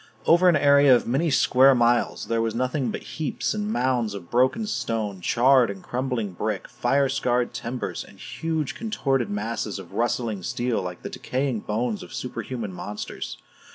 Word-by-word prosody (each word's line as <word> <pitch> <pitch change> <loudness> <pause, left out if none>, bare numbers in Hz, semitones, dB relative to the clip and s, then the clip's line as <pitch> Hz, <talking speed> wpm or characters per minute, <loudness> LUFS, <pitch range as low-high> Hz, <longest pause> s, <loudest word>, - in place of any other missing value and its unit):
Over 175 +2 +6
an 170 - +4
area 140 -2 +6
of 120 - 0
many 140 +8 +1
square 135 -1 +5
miles, 120 0 +2
there 115 0 0
was 115 -1 -1
nothing 130 +1 0
but - - -5
heaps 155 -2 -3
and 210 0 -2
mounds 125 - 0
of 85 -4 -9
broken 130 - +2
stone, 110 - -2
charred 125 +4 +4
and 100 -1 -7
crumbling 125 -5 -2
brick, 105 +2 -3
fire 135 +3 +1
scarred 125 -2 0
timbers, 125 +2 -4
and - - -16
huge 160 -3 -3
contorted 135 - -1
masses 105 +1 -3
of 95 -1 -10
rusting 115 -2 -1
steel 120 +5 -1
like 90 -1 -6
the - - -4
decaying 130 -3 -2
bones 110 +1 -2
of - - -9
superhuman 120 -5 -5
monsters. 105 +3 -6
120 Hz, 165 wpm, -25 LUFS, 110-135 Hz, -, Over